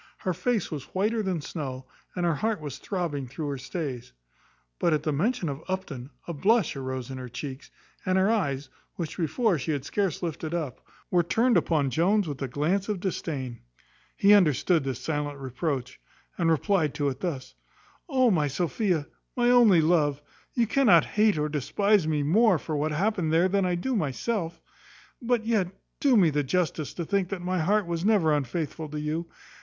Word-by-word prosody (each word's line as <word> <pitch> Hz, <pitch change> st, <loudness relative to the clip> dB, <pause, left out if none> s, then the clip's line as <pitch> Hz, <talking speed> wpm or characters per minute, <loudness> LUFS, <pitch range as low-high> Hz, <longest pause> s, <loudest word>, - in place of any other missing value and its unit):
Her 185 Hz, -, -2 dB
face 200 Hz, +4 st, -1 dB
was 145 Hz, 0 st, -7 dB
whiter 215 Hz, +4 st, +1 dB
than 185 Hz, -5 st, -2 dB
snow, 135 Hz, -5 st, -5 dB, 0.3 s
and 180 Hz, -1 st, 0 dB
her 170 Hz, -, +3 dB
heart 215 Hz, +7 st, -1 dB
was 145 Hz, -3 st, -7 dB
throbbing 165 Hz, -9 st, -3 dB
through 145 Hz, +4 st, -5 dB
her 140 Hz, -2 st, -4 dB
stays. 135 Hz, -, -5 dB, 0.7 s
But, 170 Hz, -, +2 dB
at 150 Hz, -1 st, 0 dB
the 155 Hz, -, 0 dB
mention 190 Hz, -, 0 dB
of 145 Hz, +2 st, -5 dB
Upton, 160 Hz, -9 st, -4 dB, 0.2 s
a 170 Hz, -, -3 dB
blush 200 Hz, +4 st, +2 dB
arose 130 Hz, -1 st, -4 dB
in 130 Hz, -, -6 dB
her 125 Hz, -1 st, -7 dB
cheeks, 130 Hz, +2 st, -7 dB, 0.3 s
and 185 Hz, 0 st, +1 dB
her 190 Hz, +3 st, +3 dB
eyes, 145 Hz, -11 st, -1 dB, 0.3 s
which 170 Hz, -4 st, -5 dB
before 185 Hz, -, +1 dB
she 155 Hz, +4 st, -1 dB
had 140 Hz, -2 st, -3 dB
scarce 190 Hz, -1 st, -1 dB
lifted 160 Hz, 0 st, -3 dB
up, 150 Hz, -8 st, -4 dB, 0.3 s
were 175 Hz, -, +4 dB
turned 230 Hz, +8 st, +2 dB
upon 155 Hz, -5 st, +2 dB
Jones 185 Hz, -, +2 dB
with 145 Hz, -2 st, -5 dB
a 135 Hz, -, -1 dB
glance 170 Hz, -, 0 dB
of 205 Hz, -3 st, -1 dB
disdain. 145 Hz, -9 st, -4 dB, 0.6 s
He 205 Hz, +1 st, +6 dB
understood 170 Hz, -3 st, +4 dB
this 135 Hz, -3 st, -3 dB
silent 145 Hz, +1 st, -3 dB
reproach, 130 Hz, -1 st, -3 dB, 0.4 s
and 170 Hz, -2 st, +1 dB
replied 165 Hz, -1 st, +1 dB
to 145 Hz, -, 0 dB
it 130 Hz, -1 st, -6 dB
thus: 145 Hz, -8 st, -4 dB, 0.6 s
"O 260 Hz, -4 st, +4 dB
my 155 Hz, -6 st, +2 dB
Sophia! 175 Hz, -, 0 dB, 0.3 s
my 245 Hz, 0 st, +4 dB
only 225 Hz, -9 st, +6 dB
love! 155 Hz, -3 st, +2 dB, 0.4 s
you 235 Hz, -, +3 dB
cannot 250 Hz, 0 st, +5 dB
hate 210 Hz, -3 st, +2 dB
or 150 Hz, 0 st, 0 dB
despise 180 Hz, +6 st, +1 dB
me 150 Hz, -2 st, +1 dB
more 195 Hz, +5 st, +4 dB
for 155 Hz, 0 st, -4 dB
what 150 Hz, +2 st, 0 dB
happened 180 Hz, 0 st, 0 dB
there 165 Hz, +3 st, +4 dB
than 195 Hz, 0 st, +1 dB
I 180 Hz, -, +1 dB
do 250 Hz, +9 st, -1 dB
myself; 170 Hz, -, -2 dB, 0.6 s
but 235 Hz, -2 st, 0 dB
yet 220 Hz, -5 st, +2 dB, 0.3 s
do 270 Hz, -4 st, +4 dB
me 175 Hz, -6 st, +5 dB
the 145 Hz, 0 st, +1 dB
justice 155 Hz, 0 st, -1 dB
to 170 Hz, -, -3 dB
think 195 Hz, 0 st, 0 dB
that 190 Hz, -3 st, -4 dB
my 185 Hz, 0 st, 0 dB
heart 200 Hz, +5 st, +2 dB
was 170 Hz, 0 st, -3 dB
never 195 Hz, -7 st, +3 dB
unfaithful 155 Hz, +3 st, -3 dB
to 150 Hz, 0 st, -4 dB
you. 155 Hz, +3 st, -3 dB
165 Hz, 185 wpm, -27 LUFS, 145-195 Hz, 0.7 s, He